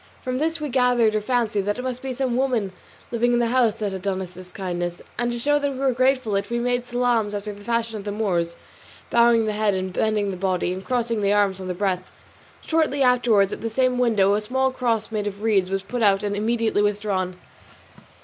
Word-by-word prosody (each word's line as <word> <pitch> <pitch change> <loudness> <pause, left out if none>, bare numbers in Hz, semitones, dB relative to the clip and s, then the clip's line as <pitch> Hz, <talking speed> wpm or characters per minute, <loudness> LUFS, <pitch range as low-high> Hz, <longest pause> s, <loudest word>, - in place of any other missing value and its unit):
From 255 0 -2
this 320 +2 0
we 300 -1 -3
gathered 245 -3 +3
or 215 - 0
fancied 225 -2 0
that 205 - 0
it 250 - -5
must 255 -1 -4
be 265 - -4
some 255 -1 -1
woman 245 -7 0 0.4
living 240 +1 +1
in - - +3
that 235 -1 +1
house 240 -4 +3
that 210 -3 -3
had 190 -1 -5
done 190 -1 -1
us 185 -2 -6
this 180 0 -10
kindness, 175 -2 -4 0.2
and 240 0 +1
to 240 - -3
show 290 +5 +2
that 285 -1 -1
we - - -8
were 270 0 +2
grateful 255 -2 +1
for 195 - +2
it, 200 - -7
we 235 - -1
made 245 0 -1
salaams 240 -4 +1
after 205 +1 -4
the 205 0 -13
fashion 230 -1 -1
of - - -8
the 205 - -4
Moors, 175 -5 -1 0.6
bowing 235 -1 +4
the 215 - 0
head, 200 -3 0
bending 210 -1 0
the 185 - -6
body, 180 -1 0
and 190 +1 -6
crossing 235 -2 0
the 200 0 +2
arms 200 -2 +2
on 185 - -6
the 180 - -3
breast. 185 -1 0 0.6
Shortly 310 -4 +1
afterwards 240 -6 +3
at - - -7
the 230 - -2
same 255 +2 +1
window 210 -5 +3
a 210 - +1
small 265 +4 0
cross 235 -4 -1
made 210 -2 -2
of 205 +1 -6
reeds 200 -5 +2
was 195 0 -2
put 245 +4 -4
out 200 -1 +3
and 205 -1 -1
immediately 220 0 +1
withdrawn. 200 -3 -1
220 Hz, 235 wpm, -23 LUFS, 200-245 Hz, 0.6 s, bowing